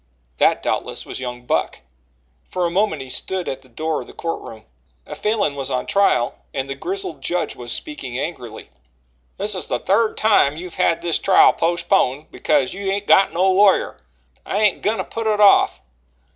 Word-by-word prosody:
That, - - +3
doubtless, - - -2
was - - -7
young 125 -1 -6
Buck. - - -1 0.7
For 180 -1 -1
a 170 - -1
moment 180 -6 0
he 130 - -12
stood 185 +4 -2
at 135 0 -4
the 130 - -21
door 155 +6 -2
of - - -11
the - - -13
court 165 0 -4
room. 110 -1 -11 0.4
A - - -8
Falin 210 -7 0
was 135 -2 -4
on 125 -1 -2
trial 195 -12 +1 0.2
and 135 -1 -2
the 135 - -3
grizzled 165 0 -5
judge 175 +5 -2
was 120 -1 -7
speaking 285 - -5
angrily: 125 - -6 0.7
"This - - +1
is - - -3
the - - -1
third 215 +3 +1
time 180 -9 +3
you've 180 +1 -8
had 170 0 +1
this 170 -2 0
trial 190 - +5
postponed 165 -4 0
because 145 -4 0
you 195 +1 -6
hain't 200 +1 -1
got 195 - +5
no 180 +3 +1
lawyer. 195 +1 +3 0.5
I - - -3
ain't 210 -2 +2
goin' 215 +2 0
to - - -2
put 225 -1 -5
it 210 -1 +1
off. 205 -1 +5
170 Hz, 190 wpm, -20 LUFS, 135-200 Hz, 0.7 s, trial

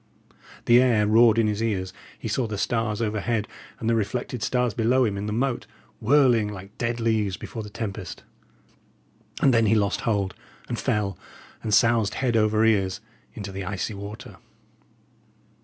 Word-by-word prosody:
The 120 +1 +6
air 115 -5 +3
roared 110 +1 +5
in 115 - +4
his 105 0 -1
ears; 95 -4 -1 0.2
he - - -6
saw 115 +3 0
the 105 -1 -4
stars 115 0 -1
overhead, 110 0 -1 0.3
and 110 - -3
the 115 - +3
reflected 115 +2 -2
stars 125 +1 0
below 120 +4 +2
him 105 -3 -1
in 100 +1 -4
the - - -2
moat, 125 +3 -1 0.3
whirling 120 -3 +4
like 100 0 -9
dead 120 0 -1
leaves 110 -4 0
before 115 - -7
the 105 - -8
tempest. 100 -4 -6 1.2
And 135 - +5
then 115 -2 +4
he 110 - +4
lost 100 -2 +1
hold, 100 -4 0 0.3
and - - -3
fell, 100 -4 -1 0.4
and 110 - -3
soused 115 -1 +3
head 125 -3 0
over 110 0 +3
ears 95 -4 +2 0.4
into 100 -2 -6
the 95 0 -5
icy 95 +3 -3
water. 105 +2 -9
110 Hz, 165 wpm, -25 LUFS, 100-115 Hz, 1.2 s, The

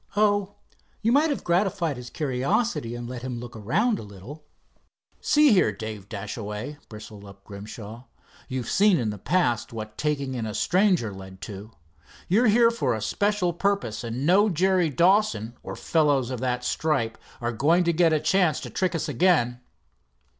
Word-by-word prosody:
"Oh, 205 -1 +2 0.5
you 225 - +3
might 295 +5 +4
have 285 - -2
gratified 175 -3 0
his 125 0 -9
curiosity 135 - -1
and 120 0 -6
let 125 -1 -6
him 125 -2 -5
look 120 0 -9
around 185 - 0
a - - -6
little." 105 +9 -11 0.8
"See 300 -2 +4
here, 180 - +4
Dave 105 -1 -7
Dashaway," 105 +6 -6
bristled 105 -1 -10
up 100 -1 -14
Grimshaw, 105 +3 -9 0.4
"you've 130 -3 -4
seen 200 -2 +4
in 115 -6 -1
the 105 - -8
past 135 - 0
what 110 -1 -7
taking 140 -3 -1
in 115 -3 -3
a 105 - -5
stranger 180 - +2
led 95 0 -11
to. 105 0 -8 0.6
You're 220 +7 +3
here 230 +2 +5
for 230 - 0
a - - -4
special 200 - 0
purpose, 185 - -1
and 120 +4 -3
no 200 +6 +5
Jerry 185 -1 +2
Dawson, 145 - +2
or - - -7
fellows 145 -6 +1
of 125 - -4
that 125 0 -1
stripe, 135 -6 0 0.2
are 120 0 -2
going 160 +10 +3
to 170 0 +1
get 165 0 +3
a 155 - +2
chance 160 0 +2
to - - -7
trick 185 -1 -1
us 165 - -2
again." 125 -5 +2
140 Hz, 170 wpm, -25 LUFS, 115-185 Hz, 0.8 s, here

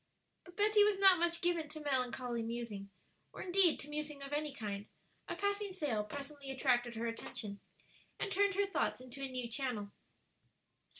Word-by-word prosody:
But 355 -1 -15
Betty 420 0 +6
was 415 -1 +4
not 385 -3 +7
much 340 0 +1
given 340 -3 +1
to 310 +1 -6
melancholy 250 -4 0
musing, 225 -4 -4 0.4
or - - -6
indeed 365 -2 +4
to 290 - -6
musing 295 -1 -4
of 275 +1 -6
any 300 0 0
kind; 210 -5 -5 0.4
a - - -3
passing 405 0 0
sail 285 - 0
presently 280 +4 -7
attracted 245 -3 +2
her 230 +1 -2
attention 215 -3 -4 0.6
and 400 - -2
turned 400 0 +3
her 405 +1 +3
thoughts 395 - 0
into 255 +2 -8
a 270 - -2
new 250 -2 -3
channel. 230 -4 -2
280 Hz, 170 wpm, -36 LUFS, 240-355 Hz, 0.6 s, not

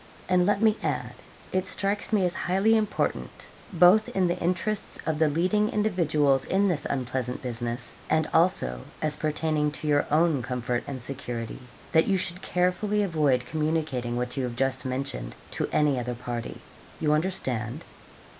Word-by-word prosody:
And 180 0 +3
let 205 +1 +2
me 220 -1 +4
add, - - -2 0.4
it 185 0 0
strikes 200 +2 -1
me 205 -4 +3
as 175 - 0
highly 195 +6 +2
important, 215 -2 -1 0.3
both 180 +4 +5
in 190 -1 +1
the 175 - 0
interests 185 +4 -2
of 155 -1 -1
the 160 - +4
leading 185 +8 +1
individuals 155 -10 +2
in 200 +2 +2
this 170 -6 -1
unpleasant 130 -1 -2
business, 120 0 -3
and 155 0 +2
also 65 - +2 0.2
as 155 -1 +1
pertaining 155 -1 0
to 150 - -4
your 145 -1 +2
own 155 -2 +3
comfort 125 0 -2
and 130 -4 -5
security, 120 -4 -4 0.3
that 160 - +4
you 195 - +3
should 180 0 +1
carefully 185 +4 +1
avoid 150 -9 +1
communicating 150 -5 -1
what 125 0 -3
you 135 - 0
have 120 -1 -5
just 135 0 -1
mentioned 130 - -3 0.2
to - - -1
any 145 -4 +2
other 125 0 -3
party. 120 -1 -5 0.4
You 150 -1 +2
understand?' 140 - -1
155 Hz, 160 wpm, -27 LUFS, 125-185 Hz, 0.4 s, both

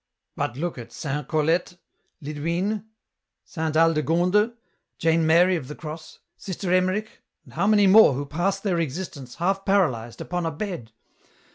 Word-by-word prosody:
" - - -58
But 120 - -2
look 170 -2 -3
at 115 -1 -10
Saint 145 +2 -4
Colette, 165 +4 0 0.5
Lidwine, 170 +8 -2 0.6
Saint 160 -2 -3
Aldegonde, 170 +7 +3 0.4
Jane 165 0 +2
Mary 175 +3 +5
of 150 -7 -4
the 150 - -7
Cross, 155 0 -9 0.2
Sister 185 -1 -3
Emmerich 185 +4 0 0.2
and - - -16
how 185 +5 0
many 210 -1 +5
more 195 -5 +7
who 140 +3 -3
passed 180 +7 -1
their 185 -5 0
existence, 145 -5 -5
half 195 +3 0
paralyzed,[upon 165 - 0
a - - -2
bed 160 - -6
170 Hz, 145 wpm, -24 LUFS, 150-190 Hz, 0.6 s, more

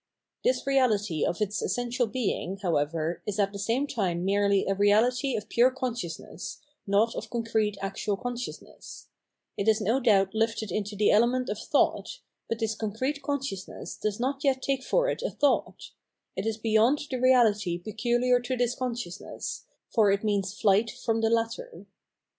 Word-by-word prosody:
This - - +2
reahty 215 - +1
of 175 - -1
its 210 0 -1
essential 245 0 -1
being, 210 -5 -2
how 175 -3 +2
ever, 155 +3 -2
is 205 -1 -2
at 200 -1 +1
the 200 - -6
same 230 +7 0
time 185 -10 -1
merely 200 0 +2
a 195 - +1
reahty 230 +6 +3
of 210 - -6
pure 240 +2 +4
consciousness, 240 -10 -5 0.3
not 210 +4 +3
of - - -6
concrete 220 -3 0
actual 195 +1 -2
consciousness: 245 +2 -7 0.5
it 200 - -2
is 220 0 +4
no 225 +5 +1
doubt 200 -6 +3
hfted 225 -2 -1
into 205 +2 -3
the 205 +1 +3
element 245 +4 +3
of - - -3
thought, - - +1 0.3
but 230 - -1
this 225 -1 -1
concrete 230 +7 -3
consciousness 275 -9 -4
does 210 0 -3
not 270 +3 -1
yet 265 -2 +1
take 275 -1 +1
it 260 - -14
for - - +2
a - - +1
thought; 290 - 0 0.4
it - - -2
is 220 -1 -1
beyond 225 +5 +3
the 260 - -1
reahty 220 -8 +3
pecuhar 240 +5 +1
to 255 +1 -2
this 245 0 +1
con 255 -2 -2
sciousness, 195 -5 -6 0.3
for 215 -3 +4
it 200 +1 +1
means 200 -2 -1
flight 210 +1 +3
from 225 +1 -2
the 225 - +3
latter. 230 - -2
225 Hz, 170 wpm, -27 LUFS, 200-250 Hz, 0.5 s, pure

